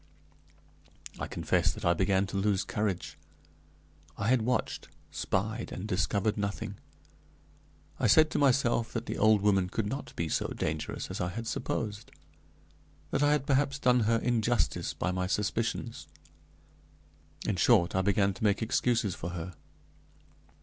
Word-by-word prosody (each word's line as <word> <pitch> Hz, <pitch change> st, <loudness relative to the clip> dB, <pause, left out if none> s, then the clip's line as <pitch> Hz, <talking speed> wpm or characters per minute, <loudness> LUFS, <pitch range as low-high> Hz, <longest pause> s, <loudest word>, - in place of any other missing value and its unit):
I -, -, -3 dB
confess -, -, +1 dB
that -, -, -7 dB
I 85 Hz, -, +5 dB
began 95 Hz, +2 st, +2 dB
to 95 Hz, -, -7 dB
lose 100 Hz, -1 st, +1 dB
courage 100 Hz, -4 st, -3 dB, 1.0 s
I 100 Hz, +2 st, -1 dB
had 130 Hz, -2 st, +4 dB
watched, 125 Hz, +1 st, -1 dB, 0.2 s
spied, 110 Hz, +4 st, -2 dB
and 95 Hz, -, -5 dB
discovered 100 Hz, +2 st, 0 dB
nothing. 100 Hz, 0 st, -3 dB, 1.2 s
I -, -, +2 dB
said 155 Hz, -1 st, +6 dB
to -, -, 0 dB
myself 125 Hz, -4 st, +2 dB
that 115 Hz, 0 st, -3 dB
the -, -, -4 dB
old 105 Hz, -1 st, +4 dB
woman 95 Hz, -3 st, +3 dB
could 110 Hz, +3 st, -2 dB
not 135 Hz, +7 st, -5 dB
be 85 Hz, -, -2 dB
so -, -, 0 dB
dangerous 75 Hz, 0 st, -3 dB
as -, -, -4 dB
I 90 Hz, -, -1 dB
had 115 Hz, +6 st, -5 dB
supposed; 105 Hz, -2 st, -3 dB, 1.0 s
that -, -, 0 dB
I 145 Hz, 0 st, +4 dB
had 150 Hz, -2 st, 0 dB
perhaps 140 Hz, 0 st, +2 dB
done 125 Hz, -3 st, +3 dB
her 115 Hz, -, +4 dB
injustice 120 Hz, 0 st, 0 dB
by 90 Hz, -, -1 dB
my 90 Hz, 0 st, -1 dB
suspicions; 115 Hz, +3 st, -2 dB, 1.4 s
in -, -, 0 dB
short, 85 Hz, 0 st, +4 dB
I 95 Hz, -, +2 dB
began 100 Hz, 0 st, +2 dB
to 95 Hz, -, -8 dB
make 105 Hz, +1 st, +2 dB
excuses 120 Hz, -3 st, +1 dB
for 85 Hz, -, -5 dB
her. 85 Hz, +2 st, -6 dB
105 Hz, 150 wpm, -30 LUFS, 95-120 Hz, 1.4 s, said